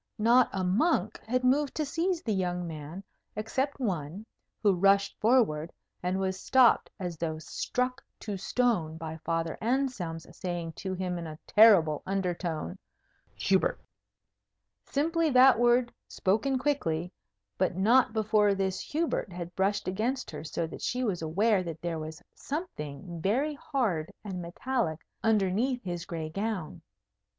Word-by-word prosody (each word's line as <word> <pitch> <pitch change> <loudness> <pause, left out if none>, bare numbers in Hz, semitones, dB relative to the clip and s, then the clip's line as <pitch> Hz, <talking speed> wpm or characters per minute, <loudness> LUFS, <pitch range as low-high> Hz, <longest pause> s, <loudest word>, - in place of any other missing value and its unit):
Not 235 +3 +5
a 190 -1 -2
monk 205 - +1
had 255 +2 0
moved 275 +3 +2
to 305 - 0
seize 335 +4 -1
the 220 - 0
young 180 -2 -1
man, 160 +3 -7 0.3
except 265 +7 -2
one, 185 - -3 0.4
who 205 -2 +5
rushed 195 +2 +3
forward, 210 -10 +2 0.3
and 180 +1 -1
was 190 -1 -1
stopped, 260 +2 +4
as 175 -3 -4
though 160 -1 -2
struck 250 +10 -2 0.2
to 210 -2 -4
stone, 190 -6 0
by 160 0 -6
Father 165 0 -2
Anselm's 225 -10 -1
saying 175 -3 -4
to 190 -1 -3
him 180 -1 -2
in 170 - -5
a 155 -1 -8
terrible 190 -9 +6
undertone, 180 -2 -2 0.6
"Hubert!" - - +1 1.1
Simply 325 +3 +1
that 255 -2 +6
word, 240 0 +3
spoken 225 +8 +1
quickly; 180 - -1 0.5
but 185 -1 +1
not 235 +6 +4
before 215 -2 +3
this 190 -1 -1
Hubert 310 - -2
had 175 0 -6
brushed 200 +1 0
against 225 +8 -1
her 150 - -7
so 165 +1 -2
that 160 - -9
she 250 +1 -1
was 195 -8 -1
aware 195 +6 +2
that 165 -3 -6
there 170 -1 -3
was 155 0 -7
something 170 - -6
very 260 - +1
hard 240 - -1
and 190 -4 -5
metallic 175 - -2 0.2
underneath 225 +4 +1
his 175 -2 -4
gray 160 -3 -4
gown. 195 -4 -3
195 Hz, 140 wpm, -29 LUFS, 170-245 Hz, 1.1 s, terrible